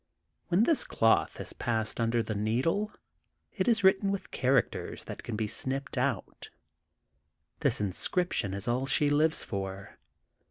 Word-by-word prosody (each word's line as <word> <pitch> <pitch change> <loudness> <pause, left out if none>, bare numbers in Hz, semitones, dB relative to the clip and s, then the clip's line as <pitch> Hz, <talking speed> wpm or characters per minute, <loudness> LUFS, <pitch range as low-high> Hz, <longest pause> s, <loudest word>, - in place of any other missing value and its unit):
When 180 +4 +3
this 320 +4 +2
cloth 115 0 +2
has - - -7
passed 110 -1 -2
under 115 0 +1
the 110 - -3
needle, 130 - 0 0.6
it - - -1
is 225 -4 +3
written 190 +1 +4
with 200 - -4
characters 130 -3 0
that - - -7
can 120 - -6
never - - -2
be 110 -1 -1
snipped 135 +5 -3
out. 125 -5 -2 1.1
This - - +1
inscription 100 - 0
is 100 - -4
all 125 +3 0
she 145 +1 +3
lives 155 +2 +2
for. 95 0 -6
125 Hz, 150 wpm, -30 LUFS, 110-165 Hz, 1.1 s, written